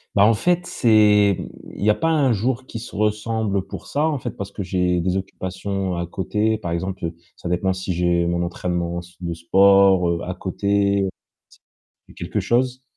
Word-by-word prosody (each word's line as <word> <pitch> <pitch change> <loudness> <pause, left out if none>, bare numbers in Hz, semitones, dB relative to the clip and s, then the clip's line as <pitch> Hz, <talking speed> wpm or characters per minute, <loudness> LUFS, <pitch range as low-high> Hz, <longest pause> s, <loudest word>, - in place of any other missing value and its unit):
Bah 100 - +6
en 115 - +5
fait, 175 +9 +1
c'est 105 - +4 0.4
il - - -6
y - - +4
a - - +3
pas 165 - 0
un 145 -5 +3
jour 120 +4 -1
qui 115 - -7
se 115 - -10
ressemble 105 -1 0
pour - - -8
ça 150 +2 0
en 155 -2 0
fait 125 -2 -5
parce 100 0 -7
que 100 - -5
j'ai 90 -1 0
des 90 +2 0
occupations 95 0 -3
à 85 0 -3
côté, 105 +5 -1
par 90 -6 -5
exemple, 90 0 -3 0.2
ça 85 - -7
dépend 90 +2 +1
si 95 0 -3
j'ai 85 0 +1
mon 85 0 0
entraînement 85 0 -2
s 90 +1 -13
de 85 -1 -3
sport, 95 +1 +5
heu, 85 0 0
à 90 - -4
côté 100 +1 0 0.4
c - - -22 0.6
quelque - - -3
chose, 125 +2 0
100 Hz, 190 wpm, -22 LUFS, 90-110 Hz, 0.6 s, Bah